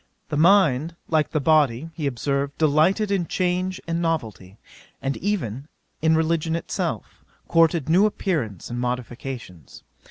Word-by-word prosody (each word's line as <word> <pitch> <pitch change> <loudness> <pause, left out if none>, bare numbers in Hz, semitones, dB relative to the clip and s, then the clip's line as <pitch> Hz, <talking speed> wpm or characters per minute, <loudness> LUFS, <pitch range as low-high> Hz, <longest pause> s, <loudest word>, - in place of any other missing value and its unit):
The 155 - -2
mind, 165 -3 +4
like 155 -2 +2
the 155 - 0
body, 150 -1 +2
he 155 -3 -3
observed, 140 +2 -2
delighted 160 +7 +2
in 185 -4 0
change 185 +1 -1
and 170 0 -2
novelty, 110 - -3 0.4
and 135 +1 -2
even 145 - -3 0.3
in 160 +1 +4
religion 160 0 +1
itself, 165 - -4 0.2
courted 165 -3 +3
new 185 +6 +5
appearances 135 - -3
and 120 - -3
modifications. 125 - -6
155 Hz, 130 wpm, -23 LUFS, 130-170 Hz, 0.4 s, new